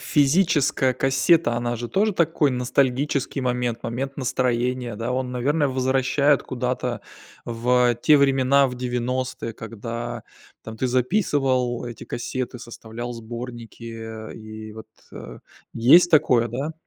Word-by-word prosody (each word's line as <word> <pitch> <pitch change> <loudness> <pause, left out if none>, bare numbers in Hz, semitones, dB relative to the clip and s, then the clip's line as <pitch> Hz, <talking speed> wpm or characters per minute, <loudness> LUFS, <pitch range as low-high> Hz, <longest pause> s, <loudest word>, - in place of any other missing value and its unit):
физическая 145 -3 +2
кассета, 135 +3 +3
она 120 0 -2
же 120 +1 -5
тоже 210 - +1
такой 165 -4 +2
ностальгический 130 +2 0
момент, 125 -2 -2
момент 130 +4 -4
настроения, 125 -2 -1
да, 115 +3 -3
он 130 0 -2
наверное 145 +4 +1
возвращает 135 +2 +2
куда-то 125 -3 -3 0.4
в 120 +1 +2
те 150 - +6
времена, 135 0 +4
в 125 - -5
90, 125 -1 -3
когда 115 +1 -6 0.4
там 110 0 -8
ты 130 +3 -1
записывал 130 - +1
эти 120 -1 -8
кассеты, 125 +1 -4
составлял 120 0 -7
сборники, 115 -1 -8
и 110 0 -9
вот, 110 0 -11 0.2
э, - - -9 0.3
есть 165 +10 +6
такое 125 -7 +4
да. 135 +7 -4
125 Hz, 120 wpm, -23 LUFS, 120-135 Hz, 0.4 s, те